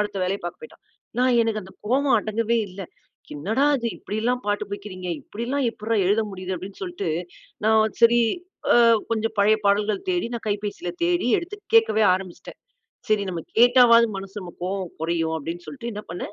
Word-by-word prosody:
அடுத்த 210 -1 -2
வேலைய 195 +2 -2
பார்க்க 175 - -6
பேய்ட்டான். - - -16 0.4
நான் 255 0 +3
எனக்கு 215 -2 -1
அந்த 190 - -13
கோவம் 265 +2 +3
அடங்கவே 225 +2 0
இல்ல. 190 +2 -10 0.6
"என்னடா 220 - +1
இது? 235 - -2
இப்படில்லா 220 +4 -1
பாட்டு 205 0 -1
படிக்கிறீங்க, 185 -3 -6
இப்படில்லா 245 +6 -3
எப்புட்றா 220 0 -2
எழுத 205 +4 +3
முடியுது?" 185 0 -4
அப்டீன்னு 190 +3 -9
சொல்லிட்டு, 350 - -3 0.6
நான் 220 0 +3
சரி, 235 +1 +6 0.5
அ - - +6 0.4
கொஞ்சம் 225 0 -1
பழைய 215 +2 +4
பாடல்கள் 205 0 +1
தேடி 350 -8 0
நான் 230 - -10
கைபேசியில 205 -4 -3
தேடி 175 +7 +1
எடுத்து, 360 +4 -7 0.2
கேட்கவே 220 - +5
ஆரம்பிச்சிட்டேன். 185 -2 -8 0.5
சரி, 215 -1 +2
நம்ம 175 -3 -3 0.2
கேட்டாவாவது 240 -1 +7
மனசு 195 +2 -7
நமக்கு 175 -2 -11
கோவம் 190 -1 -3
குறையும், 165 0 0
அப்டீன்னு 165 +3 -6
சொல்லிட்டு 235 -4 -6
என்ன 210 - -5
பண்ணேன்? 180 +3 -6
210 Hz, 165 wpm, -24 LUFS, 190-235 Hz, 0.6 s, கேட்டாவாவது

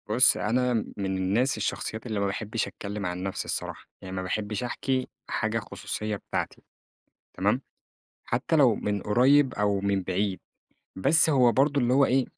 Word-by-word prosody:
بُص 125 +4 +5
أنا 125 +4 +1 0.2
من 95 -1 -2
الناس 105 +9 +1
الشخصيات 110 +2 -3
اللي 110 -4 -2
ما 100 - +1
باحبش 105 +2 -2
أتكلّم 100 0 -6
عن 90 +1 -3
نفْسي 95 0 -3
الصراحة، - - -4 0.2
يعني 95 0 -7
ما 95 - -2
باحبش 105 +3 -3
أحكي 130 +1 -1 0.2
حاجة - - -1
خصوصية 105 0 -4
بتاعتي - - -4 0.7
تمام؟ - - +1 0.6
حتى 125 +7 0
لو 130 -7 +5
من 105 -1 -2
قريب 130 +5 +4
أو 100 -1 +1
من 100 -1 0
بعيد، 95 +1 -1 0.6
بس 155 - +4
هو 125 -5 +5
برضه 140 +2 +2
اللي 120 0 +2
هو 140 +1 +5
إيه 130 0 +2
110 Hz, 160 wpm, -27 LUFS, 100-130 Hz, 0.7 s, بُص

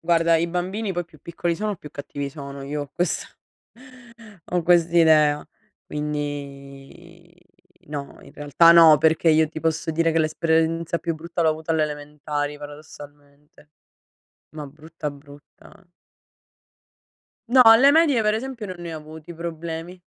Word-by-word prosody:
Guarda 165 0 +2
i 165 +1 0
bambini 190 +4 -3
poi 175 0 -3
più 160 -3 -20
piccoli 170 0 -3
sono 210 +1 -3
più 150 - -12
cattivi 145 0 -6
sono, 140 -1 -9
io 145 +1 -4
ho 140 - -11
questa 175 - -2 1.2
ho 175 -1 -1
quest'idea; 160 -3 +3 0.4
quindi 145 +3 -7 0.5
no, 145 -2 -7
in - - -15
realtà 145 +3 +4
no, 165 -2 +8
perché 160 +2 +2
io 155 0 +3
ti 160 - -7
posso 160 0 -2
dire 165 +1 +1
che 165 - +2
l'esperienza 165 +1 0
più 165 -1 -3
brutta 170 +2 -5
l'ho 160 - +3
avuta 160 +1 -3
alle 155 - +2
elementari 150 0 -5
paradossalmente. 145 0 -14 0.9
Ma 150 - -6
brutta 155 +2 -8
brutta 145 0 -17 1.8
No, 255 +1 +6
alle 235 +4 +7
medie 295 -6 +3
per 215 0 +1
esempio 235 -1 -5
non 185 - -7
ne 170 -1 -7
ho - - -5
avuti 155 +2 -11
problemi. 170 +1 -7
160 Hz, 140 wpm, -23 LUFS, 150-170 Hz, 1.8 s, no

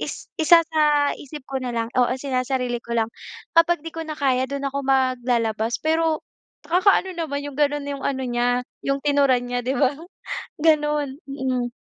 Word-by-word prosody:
is - - -6
isasa-isip 300 -3 +3
ko 270 - -3
na 250 -1 -3
lang 230 -1 -1
oo 250 0 +3
sinasarili 255 -2 -1
ko 235 - -6
lang 225 -1 +1 0.5
kapag 335 0 +5
'di - - -4
ko 330 - -6
na 315 - -5
kaya 260 -3 +2
do'n 280 0 -4
ako 280 - -1
maglalabas. 245 -4 +1
Pero 320 0 +1 0.5
nakaka-ano 375 +1 +3
naman 290 -4 -2
'yong 285 -1 -7
gano'n 290 -1 +1
'yong 280 -1 -5
ano 265 -1 -1
niya 245 +1 +1 0.2
'yong 275 0 0
tinuran 280 -3 +3
niya 245 0 -2
di 255 - 0
ba? 275 -1 +3 0.7
Gano'n, 300 -1 +1
mm. 260 -3 -2
275 Hz, 160 wpm, -23 LUFS, 250-300 Hz, 0.7 s, kapag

